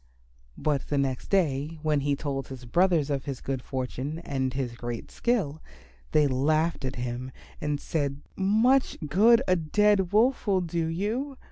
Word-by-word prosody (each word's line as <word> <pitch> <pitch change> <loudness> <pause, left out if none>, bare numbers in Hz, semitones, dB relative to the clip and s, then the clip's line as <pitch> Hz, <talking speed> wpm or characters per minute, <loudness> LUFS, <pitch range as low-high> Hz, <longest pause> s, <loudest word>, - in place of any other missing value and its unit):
But 145 -3 -1
the 145 - -1
next 135 -2 -1
day 160 -4 +1
when 155 -2 +2
he 140 0 +1
told 135 -2 -3
his 130 -2 -9
brothers 165 +1 +2
of 135 -2 -2
his 135 -3 -4
good 135 -2 -3
fortune 130 +4 -4
and 135 -5 -2
his 130 -2 -3
great 120 -1 -6
skill, 175 -11 -1 0.5
they 150 - +4
laughed 155 +4 +1
at 130 0 -3
him 120 0 -4
loudly 130 - -10 0.4
and 145 -1 0
said, 145 -3 -2
"Much 225 +7 +3
good 220 - +5
a 185 - +4
dead 190 +3 +2
Wolf 230 +4 +3
will 190 -2 +3
do 170 -1 -1
you. 225 - -2
150 Hz, 165 wpm, -27 LUFS, 135-190 Hz, 0.5 s, good